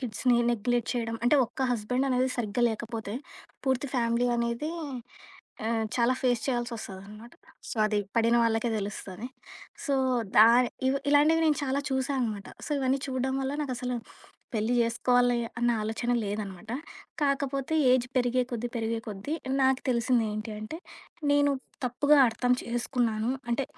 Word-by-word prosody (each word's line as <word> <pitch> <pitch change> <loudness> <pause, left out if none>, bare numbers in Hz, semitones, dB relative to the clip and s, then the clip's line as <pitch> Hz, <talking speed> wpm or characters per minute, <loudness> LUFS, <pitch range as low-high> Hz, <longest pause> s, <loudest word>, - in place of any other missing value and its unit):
కిడ్స్‌ని 240 0 +1
neglect 240 +1 0
చేయడం 230 -1 -2
అంటే 285 +5 +5
ఒక్క 250 - -5
హస్బెండ్ 250 +4 0
అనేది 255 +1 +2
సరిగ్గా 240 +1 0
లేకపోతే, 220 -1 -5 0.5
పూర్తి 260 +1 +1
ఫ్యామిలీ 235 +1 +2
అనేది 235 +6 -1 1.0
ఆహ్, 225 -1 0
చాలా 240 +1 +3
ఫేస్ 245 -3 +2
చేయాల్సొస్తదనమాట. 225 -3 -5 0.4
సో, 275 - -5
అది 210 -1 0 0.2
పడిన 230 +1 +4
వాళ్ళకే 225 +1 +1
తెలుస్తది. 200 +1 -5 0.6
సో, 280 - +1 0.4
దాని 235 +3 +7 0.2
ఇవ్ 275 - +1
ఇలాంటివి 310 +3 +5
నేను 300 -3 +2
చాలా 270 +1 0
చూసా 265 +1 0
అనమాట. 215 -4 -2 0.2
సో, - - -8
ఇవన్నీ 265 +1 +1
చూడ్డం 260 0 -1
వల్ల 265 +1 -2
నాకసల 250 -3 -3 0.6
పెళ్లి 220 +3 +1
జేసుకోవాలి 245 +1 +3 0.2
అన్న 240 0 +2
ఆలోచన 225 +3 -2
లేదనమాట. 205 0 -5 0.5
కాకపోతే 275 +1 0 0.2
ఏజ్ 250 -1 +3
పెరిగే 250 0 +2
కొద్దీ, 240 0 -3
పెరిగే 225 0 -1
కొద్దీ, 205 +8 -5 0.3
నాకు 265 -1 +3
తెలిసిందేంటి 225 -3 0
అంటే, 215 +9 -6 0.6
నేను 285 0 +4 0.4
తప్పుగా 285 +4 +3
అర్థం 245 +2 +1
చేసుకున్నాను. 235 -1 -1 0.2
అంటే 260 +3 +1
240 Hz, 135 wpm, -28 LUFS, 225-260 Hz, 1.0 s, దాని